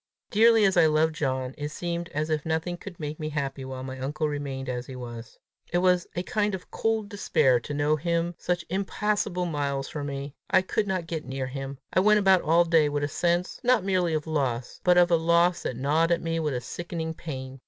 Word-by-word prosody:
Dearly 225 0 +6
as 190 -2 +2
I 165 -2 +7
loved 155 +1 +2
John, 130 -4 -2
it 145 0 -3
seemed 170 +2 -4
as 155 0 -2
if 155 -1 0
nothing 160 +2 -1
could 175 0 -10
make 150 0 -5
me 155 -1 -3
happy 140 -2 -3
while 130 0 -6
my 130 0 -6
uncle 150 +4 -1
remained 140 -2 -4
as 125 0 -4
he 130 - -8
was. 120 -2 -8 0.3
It 175 - +2
was 180 -1 +3
a 175 - -1
kind 210 0 0
of 185 - -11
cold 225 -2 0
despair 135 - +2
to 145 - -7
know 145 +1 +2
him 170 +2 -1
such 175 -1 -1
impassable 195 -1 -1
miles 140 -4 -2
from 145 -2 -4
me. 140 0 -5 0.2
I - - +4
could 205 +2 -1
not 185 -3 -1
get 165 -2 -4
near 130 0 -3
him! 135 +1 -6 0.2
I - - +4
went 210 +2 +5
about 190 -3 +5
all 170 +2 +4
day 165 -3 +4
with 145 0 -1
a - - +1
sense 175 +4 0
not 245 -4 +3
merely 180 -4 +1
of 150 - -2
loss, 130 -6 -2
but 180 -1 +5
of 175 0 +5
a - - +6
loss 170 +1 +3
that 125 - -3
gnawed 155 +6 +2
at 170 - +1
me 165 0 -1
with 150 -4 -1
a 125 - -2
sickening 165 +3 -5
pain. 135 -5 -7
160 Hz, 225 wpm, -27 LUFS, 140-175 Hz, 0.3 s, I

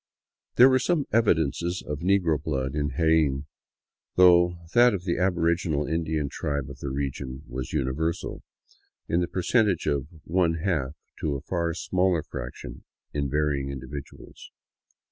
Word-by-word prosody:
There 125 - +8
were 130 -1 +4
some 155 -1 +1
evidences 85 -5 +1
of 75 -1 -4
negro 85 -4 +2
blood 65 -3 -2
in 75 -2 -1
Jaen, 80 -4 +2 0.7
though 90 -1 +6 0.2
that 120 -2 +6
of 90 - -5
the 85 -2 -1
aboriginal 85 -4 +1
Indian 80 -2 -1
tribe 70 -1 -3
of 70 - -11
the 70 - -4
region 65 0 -4
was 65 +1 -5
universal, 75 +4 -2 0.7
in 85 - +1
the 85 - 0
percent 105 +5 +2
age 95 - -1
of 70 -1 0 0.2
one 85 -1 +1
half 80 -5 -1 0.2
to 75 -3 -1
a 70 - -4
far 85 0 -2
smaller 90 -2 +1
fraction - - -8 0.3
in 70 -1 -1
varying 70 -1 0
individuals. 70 +1 -9
80 Hz, 145 wpm, -26 LUFS, 70-90 Hz, 0.7 s, There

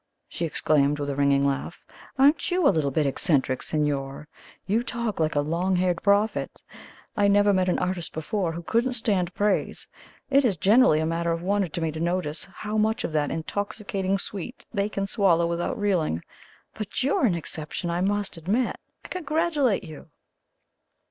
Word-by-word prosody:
she 170 - -3
exclaimed, 150 -2 +2
with 145 -1 -3
a - - -4
ringing 140 0 +3
laugh, 140 +4 -3 0.3
"aren't 285 +7 +4
you 360 -2 +1
a - - +6
little 155 -4 +1
bit 150 +2 0
eccentric, 135 -2 +1
signor? 145 -2 -2 0.4
You 210 +5 +1
talk 235 -4 -3
like 155 -1 0
a 145 - +3
long 170 +5 0
haired 180 -1 +1
prophet! 205 +2 +1 0.5
I 205 - +3
never 205 0 +4
met 185 -1 +2
an - - +1
artist 180 -2 -2
before 170 +3 -2
who 170 +1 -6
couldn't 235 +8 +1
stand 200 -7 0
praise; 205 -1 0 0.4
it 275 +1 +5
is 210 -8 +1
generally 205 - +5
a - - 0
matter 170 +1 -1
of 165 +1 -2
wonder 200 0 +1
to 170 +2 -5
me 160 -1 0
to 155 - -6
notice 170 -2 -1
how 210 +2 -4
much 220 +1 +1
of - - -2
that 150 -2 +1
intoxicating 195 +3 -2
sweet 200 +5 -5
they 200 -1 0
can 195 -1 -2
swallow 190 -5 +2
without 170 +9 -2
reeling. 175 - 0 0.5
But 215 +3 -4
you're 265 -1 +2
an 180 - +1
exception, 165 +1 -4
I 175 +1 -1
must 200 -1 -1
admit. 205 +10 0 0.3
I - - -7
congratulate 310 - 0
you!" 160 -2 -11
185 Hz, 175 wpm, -25 LUFS, 160-210 Hz, 0.5 s, a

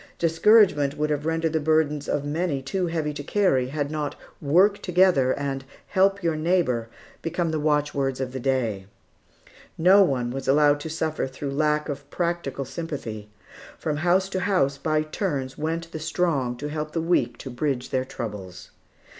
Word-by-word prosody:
Discouragement 165 -4 +4
would 150 0 0
have 150 +1 -1
rendered 165 0 0
the 160 - +2
burdens 150 -1 +1
of 145 - -1
many 155 0 -1
too 180 +7 -1
heavy 160 -3 -2
to 145 - -6
carry, 145 -6 +1
had 145 +1 -3
not 150 -2 -3 0.3
"work 185 +8 +3
together," 180 -8 +3
and 135 -1 -3 0.3
"help 195 0 +2
your 165 -2 +1
neighbor," 155 -8 +1 0.3
become 165 0 -1
the 155 - -1
watchwords 145 -3 0
of 130 -1 -3
the 130 - -5
day. 120 -7 -1 0.9
No 185 +5 +6
one 130 -9 +1
was 135 +1 -5
allowed 145 +1 +4
to 160 - -6
suffer 155 -2 -2
through 135 +1 -5
lack 150 +1 +1
of 145 -1 -6
practical 170 -6 -2
sympathy. 130 -9 -6 0.5
From 150 -2 -2
house 180 +4 +2
to 190 - -2
house, 160 -9 +1
by 155 +1 +1
turns, 145 -5 -3
went 165 +2 -3
the 160 - -5
strong 155 -6 0
to 145 +3 -5
help 150 0 -4
the 165 - 0
weak 145 -8 +1
to 130 - -8
bridge 130 0 -2
their 130 -1 +1
troubles. 105 -8 -7
150 Hz, 170 wpm, -25 LUFS, 135-165 Hz, 0.9 s, No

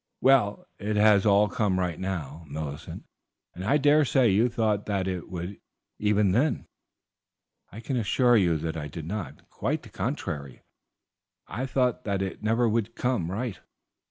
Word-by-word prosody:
"Well, 130 -6 +3
it 105 +1 -2
has 105 -1 +5
all 100 +1 +5
come 100 -2 0
right 90 -3 -2
now, 85 -5 -4
Millicent, 75 -1 -6 0.5
and 90 - -7
I 135 +9 +3
dare 150 +1 +5
say 130 -3 +3
you 110 +6 +3
thought 110 -3 0
that 100 -3 -1
it 90 -2 -4
would, 90 +2 -6 0.4
even 105 -2 +2
then." 130 +10 +1 1.1
"I 110 - -9
can 130 +2 -2
assure 120 +2 +3
you 90 -7 +3
that 80 +1 -4
I 75 -2 -4
did 75 +2 -7
not; 100 +3 -6
quite - - -2
the - - -12
contrary, 70 -3 -4 0.8
I 130 +4 -4
thought 125 -1 0
that 100 -2 0
it 95 - -5
never 115 +3 +2
would 115 0 -1
come 125 -10 -1
right. 110 +2 -3
105 Hz, 160 wpm, -27 LUFS, 90-120 Hz, 1.1 s, has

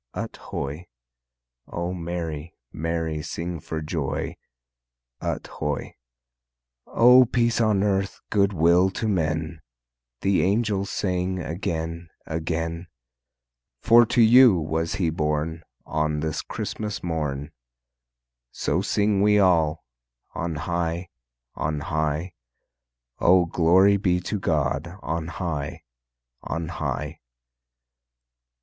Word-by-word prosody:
Ut - - -4
hoy! 75 +6 -5 0.8
O 85 +1 -3
merry, 85 -3 -5 0.2
merry 80 -1 -2
sing 85 +2 -4
for 80 +1 -5
joy, 75 -3 -3 0.9
Ut - - -3
hoy! 75 -3 -4 0.9
O 125 +2 +7
peace 120 -1 +1
on 105 -3 +3
earth, 100 -1 0
good 100 -1 +3
will 85 +1 +4
to 110 +4 -3
men, 80 -3 -1 0.6
The 100 -1 +2
angels 100 0 +1
sang 90 -1 -1
again, 85 -1 -4 0.2
again, 80 +1 -3 1.0
For 120 +1 +7
to 120 - +3
you 120 -1 +8
was 80 +2 -1
He 90 -5 0
born 75 +1 -1 0.2
On 75 -1 -1
this 80 -1 -2
Christmas 105 -3 -5
morn, 75 -4 -3 1.0
So 85 +5 0
sing 100 0 +1
we 105 0 +5
all: 85 -5 +3 0.5
On 85 -1 -3
high, 85 +2 -2 0.4
On 75 -1 -2
high, 80 +3 -2 0.9
O 90 0 +5
glory 90 +4 +4
be 90 -2 +1
to 105 +3 -3
God 75 +1 -1
on 80 0 -2
high, 80 -5 -4 0.6
On 85 0 -4
high! - - -4
85 Hz, 105 wpm, -25 LUFS, 80-95 Hz, 1.0 s, you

